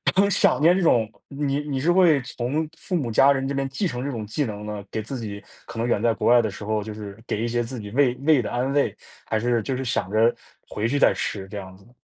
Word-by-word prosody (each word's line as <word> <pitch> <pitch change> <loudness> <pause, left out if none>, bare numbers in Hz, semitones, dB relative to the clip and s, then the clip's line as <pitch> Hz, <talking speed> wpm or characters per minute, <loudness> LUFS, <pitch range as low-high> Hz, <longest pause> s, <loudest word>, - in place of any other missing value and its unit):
很 200 +2 +4
想 - - +4
念 165 +4 +5
这 190 - +1
种 120 -10 +3 0.2
你 140 0 -2
你 145 -2 -3
是 160 +6 +2
会 175 -5 +5
从 125 +6 -2
父 185 - -3
母 135 -9 -1
家 135 +5 +6
人 135 -1 0
这 140 - -2
边 135 -1 -1
继 135 +9 -2
承 125 -5 -4
这 140 - -2
种 115 -6 -4
技 110 +8 -2
能 105 -4 -5
呢？ 105 -1 -5
给 110 - -4
自 130 +4 -5
己 105 -3 -6 0.3
可 115 - -9
能 115 +1 0
远 120 - +1
在 115 -1 +2
国 - - -1
外 120 0 +7
的 110 - -1
时 105 - -9
候， 110 0 0
就 110 0 -7
是， 105 -2 -8
给 - - -2
一 - - 0
些 120 0 0
自 120 +1 -6
己 105 -1 -8
胃 125 0 +3
胃 155 -4 +5
的 110 - -4
安 130 +3 -1
慰， 145 0 +1 0.3
还 110 - 0
是 120 0 +1
就 130 +3 -3
是 130 - -4
想 120 -6 -1
着 115 +2 +3 0.3
回 105 +2 -2
去 140 +5 0
再 - - +5
吃， 95 -2 -3
这 105 +2 -8
样 95 -1 -10
子 95 - -21
呢？ 120 - -21
120 Hz, 305 characters per minute, -24 LUFS, 110-140 Hz, 0.3 s, 外